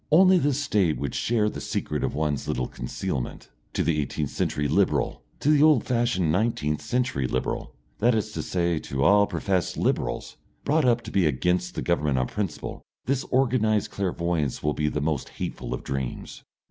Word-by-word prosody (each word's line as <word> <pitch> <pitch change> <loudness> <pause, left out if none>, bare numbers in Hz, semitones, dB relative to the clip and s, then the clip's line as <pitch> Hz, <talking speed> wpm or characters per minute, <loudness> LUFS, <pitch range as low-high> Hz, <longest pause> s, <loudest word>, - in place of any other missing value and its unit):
Only 185 +3 +7
the 145 -2 +2
State 105 - +1
would 70 -2 -3
share 110 -2 +1
the - - -4
secret - - -2
of - - -1
one's 75 -2 -1
little 60 0 -1
concealment. - - -4 0.2
To - - +1
the 75 -3 +1
eighteenth 75 +1 -3
century 75 0 -1
Liberal, - - +1 0.2
to 150 - +3
the 150 -1 +5
old 155 -6 +6
fashioned 115 -9 +1
nineteenth 80 -6 0
century 125 - 0
Liberal, 65 - -3 0.2
that 120 +2 +4
is 110 - -1
to - - -3
say 85 -3 0
to 65 -2 -2
all 100 +5 +5
professed 95 -3 -1
Liberals, - - -1 0.3
brought 155 0 +3
up 120 -1 +3
to - - -7
be 95 -5 +3
against 90 +6 0
the - - -3
Government 75 -6 +1
on 65 - +2
principle, 100 +4 -4 0.2
this 135 0 0
organised 115 -5 +2
clairvoyance 85 -7 -1
will 75 0 +1
be 75 0 -1
the 75 0 -1
most 75 -3 -1
hateful - - -4
of - - -3
dreams. 65 -2 -4
90 Hz, 180 wpm, -26 LUFS, 75-120 Hz, 0.3 s, Only